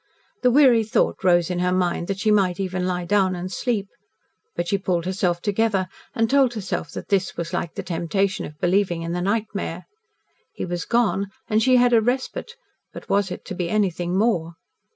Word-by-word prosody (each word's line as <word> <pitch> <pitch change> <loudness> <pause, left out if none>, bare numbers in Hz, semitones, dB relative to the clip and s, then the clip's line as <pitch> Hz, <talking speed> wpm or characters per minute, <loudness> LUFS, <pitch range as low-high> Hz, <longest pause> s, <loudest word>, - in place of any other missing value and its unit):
The 250 - +4
weary 250 -3 +5
thought 220 - 0
rose 175 -1 +3
in 180 - -1
her 180 0 +1
mind 180 -1 0
that 195 - -2
she 215 +2 +1
might 190 -4 +2
even 185 -1 -2
lie 180 -1 -2
down 190 -1 +2
and 180 +1 -5
sleep. 210 0 -1 0.7
But 175 - -2
she 200 - +1
pulled 180 -3 -1
herself 180 -2 -1
together 205 -2 +1 0.3
and 225 0 +2
told 265 -1 +3
herself 200 -4 -3
that - - -7
this 195 -2 0
was 170 +1 -4
like 170 -2 -3
the - - -4
temptation 185 +3 -1
of 150 - -14
believing 180 -2 +1
in 165 - -4
the 175 +1 -2
nightmare. 200 -3 -2 0.7
He - - -3
was 175 -1 -4
gone, 225 -4 +1 0.2
and 215 +1 +2
she 255 +2 +4
had 245 0 +4
a 230 - +6
respite 260 - -2 0.4
but - - -11
was 200 -1 +2
it - - -7
to - - -6
be 175 -1 -3
anything 180 -3 0
more? 175 -7 +1
190 Hz, 195 wpm, -23 LUFS, 175-215 Hz, 0.7 s, a